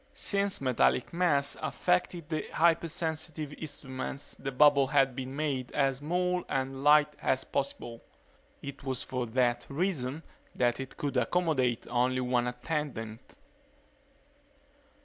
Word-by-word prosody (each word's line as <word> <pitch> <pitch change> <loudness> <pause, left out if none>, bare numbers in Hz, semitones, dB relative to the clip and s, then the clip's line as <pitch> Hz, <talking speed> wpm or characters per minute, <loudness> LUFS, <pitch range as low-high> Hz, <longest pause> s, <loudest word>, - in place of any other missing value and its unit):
Since 200 -3 0
metallic 130 +1 +2
mass 150 -5 +2
affected 160 - 0
the 155 -1 -2
hypersensitive 160 -2 0
instruments 140 -2 -6
the 135 0 -5
bubble 140 0 +5
had 135 -2 +3
been 130 +1 -5
made 140 -4 -2
as 135 -2 +2
small 180 +5 0
and 135 0 -2
light 150 0 +5
as 130 0 +1
possible. 120 -4 -3 0.6
It 140 0 -7
was 130 -2 -2
for 125 -2 -3
that 120 0 +1
reason 150 -2 -1 0.3
that 120 -1 +1
it 135 -1 -7
could 145 -1 -2
accommodate 130 -9 +1
only 125 +1 +1
one 125 -1 +1
attendant. 125 -4 -4
140 Hz, 120 wpm, -30 LUFS, 130-155 Hz, 0.6 s, bubble